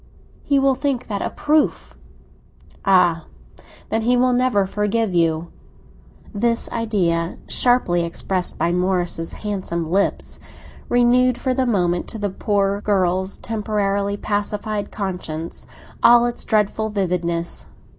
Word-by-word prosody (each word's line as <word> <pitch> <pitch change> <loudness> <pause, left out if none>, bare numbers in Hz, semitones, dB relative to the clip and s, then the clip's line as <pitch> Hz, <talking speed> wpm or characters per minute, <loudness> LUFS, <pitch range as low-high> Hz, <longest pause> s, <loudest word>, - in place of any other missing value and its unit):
He 280 - +1
will 270 0 +4
think 265 -1 -2
that 200 -2 -2
a - - -1
proof." 300 0 0 0.9
"Ah, 180 -4 +3 0.6
then, 225 +1 +1
he 245 +2 +2
will 250 0 +3
never 245 -5 +2
forgive 210 +1 -1
you!" 165 -1 +1 0.8
This 230 +2 +1
idea, 180 -7 0
sharply 245 -9 +2
expressed 180 +2 -2
by 170 - +1
Morris's 180 -2 -1
handsome 175 -6 -4
lips, 200 +2 0 0.5
renewed 245 +1 +4
for 260 +1 -1
a 255 0 +1
moment, 175 -6 +1
to - - -7
the 205 -2 -2
poor 200 0 0
girl's 190 -2 +1
temporarily 200 -2 -1
pacified 205 0 -2
conscience, 180 -5 -5 0.3
all 240 0 +7
its 240 0 -3
dreadful 220 0 +1
vividness. 175 -4 -1
205 Hz, 120 wpm, -21 LUFS, 180-230 Hz, 0.9 s, all